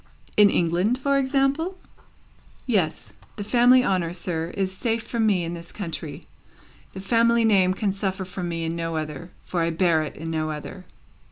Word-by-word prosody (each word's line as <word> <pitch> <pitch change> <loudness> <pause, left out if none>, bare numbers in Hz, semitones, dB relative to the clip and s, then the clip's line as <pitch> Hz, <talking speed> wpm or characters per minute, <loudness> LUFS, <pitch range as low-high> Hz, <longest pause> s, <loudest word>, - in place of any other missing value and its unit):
"In 205 -1 +7
England, 180 +7 +1
for 275 +1 +1
example?" 275 +7 0 0.9
"Yes. 190 -10 -1 0.2
The 205 - -5
family 245 +4 +5
honour, 180 -5 0
sir, 170 -2 -3
is 190 -1 0
safe 230 +1 -1
from 230 -2 0
me 190 -4 +2
in 170 +1 -4
this 170 0 -8
country. 160 -5 -6 0.7
The 190 - -7
family 230 +3 +3
name 190 -4 +4
can 200 0 0
suffer 190 -1 -3
from 180 -1 -5
me 165 -1 -3
in 165 +1 -2
no 165 -1 -3
other, 155 +1 -5 0.2
for 175 - -2
I 165 - +1
bear 165 -1 +2
it 155 - -5
in 165 +1 -6
no 155 -1 -1
other." 155 +5 -7
185 Hz, 175 wpm, -24 LUFS, 165-225 Hz, 0.9 s, In